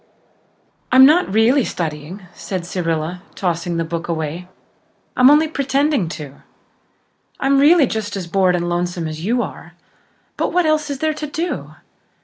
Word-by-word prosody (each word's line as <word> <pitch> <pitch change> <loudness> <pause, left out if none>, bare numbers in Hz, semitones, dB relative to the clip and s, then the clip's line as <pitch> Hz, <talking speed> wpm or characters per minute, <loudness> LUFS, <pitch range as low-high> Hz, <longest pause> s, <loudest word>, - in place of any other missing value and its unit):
"I'm 260 +1 +8
not 310 - +4
really 230 +6 +3
studying," 165 +3 -5
said 185 -3 -5
Cyrilla, 170 -1 -3
tossing 170 -2 -2
the 165 - 0
book 165 +1 -5
away. 165 +1 -4 0.7
"I'm 255 +1 +6
only 300 +2 +5
pretending 280 - 0
to. 145 -3 -10 1.0
I'm 275 0 +2
really 300 +2 +6
just 210 -3 -4
as 185 - -4
bored 185 +1 +2
and 175 0 -2
lonesome 175 -1 -2
as 155 +1 -7
you 240 +5 +1
are. - - -9 0.6
But - - -1
what 360 -1 +2
else 310 -1 +1
is 280 - -3
there 310 +3 0
to 305 0 -6
do? 330 +4 -4
195 Hz, 150 wpm, -19 LUFS, 170-280 Hz, 1.0 s, I'm